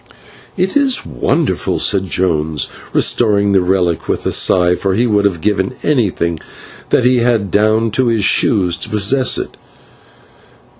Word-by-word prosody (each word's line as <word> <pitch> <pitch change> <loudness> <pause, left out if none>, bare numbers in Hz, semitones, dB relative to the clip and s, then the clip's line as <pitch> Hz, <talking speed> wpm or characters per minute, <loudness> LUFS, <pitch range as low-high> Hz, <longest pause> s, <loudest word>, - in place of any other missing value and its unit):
'" - - -25
"It 190 - -6
is 275 -3 +1
wonderful," 70 -7 -1
said 100 -2 +1
Jones, 80 -5 -1 0.2
restoring 100 -3 +1
the 95 -1 +3
relic 90 -2 -1
with - - -2
a - - 0
sigh, 90 -1 +2
for 95 +1 -2
he 120 +4 +1
would 105 -3 +1
have 90 -5 -1
given 105 +3 -1
everything 95 - -1 0.5
that - - +2
he 125 0 +3
had, 115 -5 0
down 110 +2 +1
to 130 +3 +1
his 115 -3 0
shoes, 95 -4 +2
to - - -3
possess 110 +6 +2
it. - - -6
100 Hz, 155 wpm, -15 LUFS, 90-115 Hz, 0.5 s, the